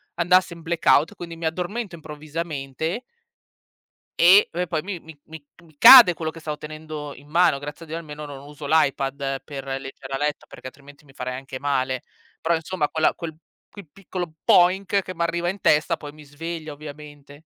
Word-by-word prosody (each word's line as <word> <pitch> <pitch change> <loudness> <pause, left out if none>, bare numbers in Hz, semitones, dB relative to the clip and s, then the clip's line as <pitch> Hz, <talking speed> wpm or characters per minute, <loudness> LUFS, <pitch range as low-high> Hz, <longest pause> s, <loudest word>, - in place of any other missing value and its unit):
andasse 180 +1 +3
in 165 - -13
blackout, 165 -2 +2
quindi 170 -1 -8
mi 165 - -6
addormento 180 +4 -3
improvvisamente 155 - -5 1.2
e 185 +4 +7
po 180 +2 -2
poi 160 -2 -2
mi 190 -1 -6
mi 160 -1 -13
mi 155 -2 -12 0.2
mi 160 -3 -22
cade 230 - +10
quello 160 -2 -3
che 165 - -11
stavo 150 -1 -5
tenendo 155 -1 -8
in 145 +3 -16
mano 165 -3 +3
grazie 145 +4 -8
a - - -20
Dio 160 - -5
almeno 150 -2 -8
non 140 -2 -9
uso 145 0 -10
l'iPad 140 -2 0
per 140 -2 -7 0.2
leggere 135 0 -10
a - - -1
letto 150 +1 -2
perché - - -14
altrimenti 140 +2 -15
mi 135 - -19
farei 125 -1 -5
anche 135 -1 -8
male. 130 -3 -1 0.4
Però, 170 +1 +2
insomma, 160 -1 -2
quella 160 -1 +2
quel 160 -2 -7 0.3
quel 200 -6 -12
piccolo 180 -3 -6
"boink" 190 +2 +4
che 185 - -7
m'arriva 170 0 -1
in 195 +2 -5
testa 150 0 +3
poi 145 -1 -9
mi 150 0 -14
sveglia 155 +1 -7
ovviamente. 145 -1 -11
155 Hz, 180 wpm, -23 LUFS, 145-170 Hz, 1.2 s, cade